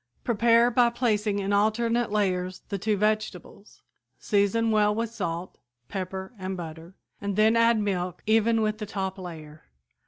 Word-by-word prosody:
Prepare 235 +1 +4
by 240 0 +4
placing 215 -4 0
in 200 0 -1
alternate 230 +3 +1
layers 185 -3 -1
the 200 -2 -3
two 215 +1 0
vegetables; 210 -1 -3 0.3
season 215 +2 +1
well 210 -1 +3
with 230 0 -2
salt, 180 -5 -5 0.3
pepper 190 +2 -5
and 190 0 -4
butter, 165 +1 -9 0.3
and 200 -1 -2
then 215 +2 +4
add 230 -1 +4
milk 185 -4 -2
even 225 +1 +3
with 215 0 -1
the 210 - -5
top 190 -1 -4
layer. 155 -4 -10
210 Hz, 150 wpm, -26 LUFS, 190-225 Hz, 0.3 s, Prepare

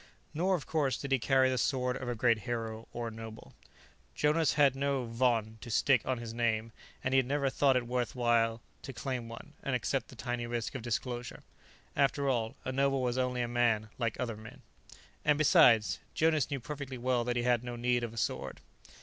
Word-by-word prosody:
Nor, 185 +5 +2
of 160 - -5
course, 145 -5 0
did 140 - -6
he 135 - +3
carry 130 +3 +3
the 130 - 0
sword 125 -2 0
of 130 -2 -5
a 120 - -1
great 115 0 +3
hero, 115 -1 -4
or 120 -1 -4
a - - -10
noble. 110 0 -10 0.6
Jonas 150 0 +2
had 140 -3 +4
no 140 -2 0
von 115 -2 0
to - - -8
stick 125 +2 +3
on 130 -1 0
his 115 -1 -6
name, 115 -1 0 0.3
and 130 - 0
he 135 - +6
had 130 - 0
never 140 -1 0
thought 135 -1 +3
it 125 - -1
worth 125 0 0
his - - -21
while 115 -2 +2 0.2
to 135 - -7
claim 125 -2 -4
one 115 - -10
and - - -1
accept - - -1
the - - -13
tiny 120 -1 -3
risk 120 0 -3
of 130 - -5
disclosure. 120 +1 -4 0.5
After 140 0 +2
all, 115 -4 0
a 130 - -1
noble 135 0 +1
was 125 +1 0
only 125 -1 0
a - - -2
man 120 -3 +1
like 115 -3 -1
other 120 -3 -2
men. 110 0 -12 0.6
And, 150 -1 +3
besides, 140 - +5 0.2
Jonas 155 -3 +2
knew 140 - -2
perfectly 140 0 -6
well 125 0 +1
that 120 0 -1
he 120 - 0
had 120 -1 +2
no 120 -1 -5
need 120 0 +1
of 115 - -3
a 115 - -12
sword. 95 - -2
125 Hz, 215 wpm, -31 LUFS, 115-135 Hz, 0.6 s, he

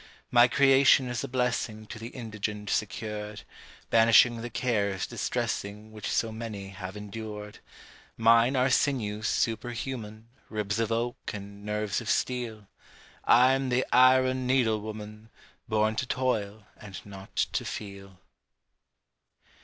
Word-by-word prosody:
My 120 0 +7
creation 135 0 +5
is 125 +1 -3
a - - -3
blessing 120 -4 -1
To 110 - -9
the 115 - -6
indigent 105 -4 -5
secured, 105 -1 -3 0.5
Banishing 115 +1 +5
the 120 - -5
cares 100 -7 -1
distressing 105 +2 -3
Which 110 -1 -6
so 115 - 0
many 110 -3 -6
have 95 +1 -8
endured: 105 0 -7 0.6
Mine 115 +3 +5
are 130 +1 +2
sinews 110 -6 0
superhuman, 115 -1 -3 0.2
Ribs 105 -1 -2
of 115 0 0
oak 120 +2 -2
and 100 0 -9
nerves 105 0 -2
of 110 - -6
steel 115 -5 -1 0.6
I'm 130 +2 +5
the 125 +1 +1
Iron 130 0 +5
Needle 120 -5 +2
Woman 105 0 -8 0.4
Born 110 0 +2
to 130 - -1
toil 110 -5 -1
and 100 -3 -9
not 100 -1 -12
to - - 0
feel. 100 -2 -8
110 Hz, 125 wpm, -28 LUFS, 105-125 Hz, 0.6 s, My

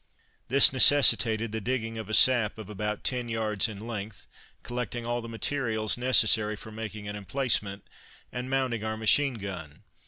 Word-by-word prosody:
] - - -41
This 135 +1 +6
necessitated 115 -5 +4
the 110 0 -4
digging 115 -1 -3
of 110 -2 -8
a 110 - 0
sap 120 -5 +3
of 105 -2 -9
about 105 0 -4
ten 125 -2 -2
yards 110 -3 0
in 110 0 -9
length, 105 -3 -7 0.4
collecting 120 -1 -5
all 120 0 -2
the 115 - -9
materials 115 -2 -2
for 110 -4 +1
making 105 -1 -7
an 100 - -6
emplacement, 105 -1 -2 0.5
and 125 +1 -6
mounting 130 -5 -1
our 110 0 -3
machine 125 +5 +2
gun. 95 -5 -8
110 Hz, 160 wpm, -27 LUFS, 105-125 Hz, 0.5 s, This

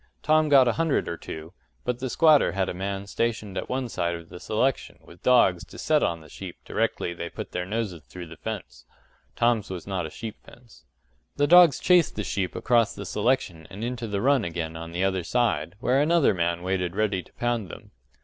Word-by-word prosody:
Tom 155 0 +3
got 135 -3 +7
a - - +4
hundred 165 -3 +1
or 85 - -3
two, 80 +1 -9 0.3
but 125 -1 -1
the 130 0 -3
squatter 155 - +4
had 95 0 0
a - - -3
man 95 +2 -4
stationed 110 -1 -2
at - - -4
one 130 0 -1
side 85 -6 -2
of 85 -1 -10
the 90 - -10
selection 125 +8 -1
with 85 +1 -16
dogs 95 -9 +4
to - - -13
set 155 -1 +2
on 85 -1 0
the 80 - -14
sheep 90 +3 -9
directly 85 - -1
they 85 0 -6
put - - -7
their 90 0 -3
noses 105 -5 -3
through 90 -1 -9
the 85 0 -11
fence 110 +4 -7 0.5
(Tom's 120 -3 +1
was 90 -3 -6
not 95 -4 -2
a - - -9
sheep 110 +6 -7
fence). 120 -2 -18 0.5
The 145 - +2
dogs 175 -3 +7
chased 180 -3 +4
the 105 - -2
sheep 95 -2 -2
across 115 -2 +2
the - - -7
selection 105 -8 -1
and 100 +3 -7
into 120 -1 -3
the 100 -2 -2
run 135 -2 +3
again 80 -2 -4
on 85 0 -7
the 90 +2 -1
other 95 -2 0
side, 115 -2 0
where 130 +2 +2
another 165 -3 +4
man 85 -1 -1
waited 90 -1 -1
ready 105 -3 0
to - - -22
pound 120 -5 -2
them. - - -11
100 Hz, 215 wpm, -26 LUFS, 90-125 Hz, 0.5 s, got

